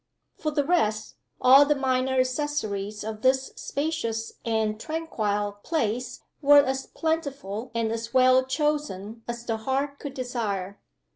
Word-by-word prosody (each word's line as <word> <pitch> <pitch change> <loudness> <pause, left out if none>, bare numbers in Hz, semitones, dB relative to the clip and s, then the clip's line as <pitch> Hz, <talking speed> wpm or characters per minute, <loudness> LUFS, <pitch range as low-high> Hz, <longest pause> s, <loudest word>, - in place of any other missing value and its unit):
For 305 - -2
the 295 -1 +1
rest, 220 -10 0 0.2
all 265 +3 +8
the 295 +1 +2
minor 260 -1 +1
accessories 235 -7 -2
of 215 0 -5
this 260 +1 +2
spacious 250 -7 -3
and 220 -2 0
tranquil 210 -10 -2
place 250 -5 -2 0.2
were 290 0 +7
as 265 0 -2
plentiful 280 - -3
and 225 -1 0
as 230 0 -4
well 255 0 +5
chosen 260 - -2
as 235 0 -5
the 225 -2 -1
heart 270 +5 -2
could 280 -2 -7
desire. 210 -7 -3
255 Hz, 135 wpm, -26 LUFS, 220-285 Hz, 0.2 s, all